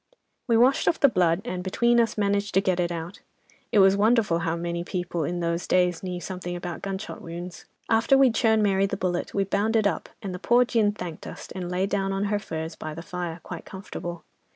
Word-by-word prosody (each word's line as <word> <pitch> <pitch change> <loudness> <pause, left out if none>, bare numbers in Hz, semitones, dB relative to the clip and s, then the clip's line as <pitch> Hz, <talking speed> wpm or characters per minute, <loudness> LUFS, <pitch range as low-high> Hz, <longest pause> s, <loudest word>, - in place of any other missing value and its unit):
"'We 230 -2 +4
washed 255 +4 +4
off 330 - +2
the 280 - +7
blood, 175 -3 +2
and 185 -7 -3
between 235 +5 +2
us, 230 -2 +1
managed 200 -1 0
to - - +7
get 185 -2 0
it 175 -1 0
out. 170 +2 -6 0.5
It - - +2
was 195 -1 +6
wonderful 210 -4 +3
how 165 -1 -1
many 170 0 -3
people 175 -2 -3
in 175 +4 -2
those 170 +1 -1
days 180 -2 +2
knew 180 -1 -4
something 180 -1 -5
about 175 -1 -5
gunshot 195 +1 -5
wounds. 170 +1 -8 0.2
After 225 +4 +4
we'd 260 -4 +5
shown 220 -2 +3
Mary 195 -1 +3
the 195 - -3
bullet, 180 -1 -2
we 200 - +2
bound 200 +3 0
it 220 -2 +3
up, 200 - -1
and 195 -2 -4
the 180 - -5
poor 240 +5 +4
gin 225 -5 +2
thanked 180 -6 -7
us, - - -9
and 180 -2 -5
lay 180 +1 0
down 195 -1 -1
on 195 +1 -1
her 205 - +2
furs 160 -4 -5
by 155 -1 -6
the 165 - -7
fire, 175 -2 -5
quite - - -7
comfortable. 175 -3 -7
190 Hz, 225 wpm, -26 LUFS, 175-210 Hz, 0.5 s, the